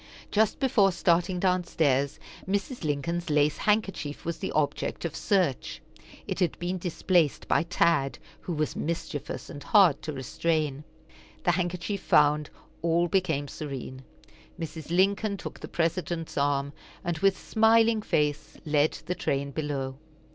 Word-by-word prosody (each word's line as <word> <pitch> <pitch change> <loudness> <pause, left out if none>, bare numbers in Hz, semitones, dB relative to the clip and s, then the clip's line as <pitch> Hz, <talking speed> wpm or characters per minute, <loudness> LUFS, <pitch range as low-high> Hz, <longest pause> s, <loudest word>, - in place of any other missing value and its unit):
Just 215 0 +2
before 220 -8 +4
starting 175 +1 +1
downstairs, 160 -7 +1 0.3
Mrs. 200 +4 -2
Lincoln's 160 +4 -2
lace 150 0 +3
handkerchief 200 -9 -1
was 170 0 -3
the - - -3
object 155 +2 -1
of 165 - -3
search. 180 - 0 0.5
It - - -4
had 175 -5 +1
been 180 +1 -3
displaced 175 -3 +1
by - - +3
Tad, 170 -4 +1 0.2
who 175 - -5
was 155 -1 -1
mischievous, 160 -2 -4
and 145 - -9
hard 190 -7 +5
to 155 - -4
restrain. 150 +1 -1 0.6
The 175 - +4
handkerchief 180 +2 -2
found, 150 -2 +3 0.3
all 170 +1 +2
became 160 -6 +1
serene. 135 -2 -6 0.6
Mrs. 160 -2 -6
Lincoln 200 +4 +2
took - - -8
the - - -7
President's 165 -1 -2
arm, 140 0 0 0.3
and 170 -2 -2
with 195 +1 +3
smiling 225 0 +3
face 150 -6 -1
led 150 0 +2
the 180 - -1
train 140 -4 -2
below. 135 -3 -3
165 Hz, 135 wpm, -28 LUFS, 145-185 Hz, 0.6 s, hard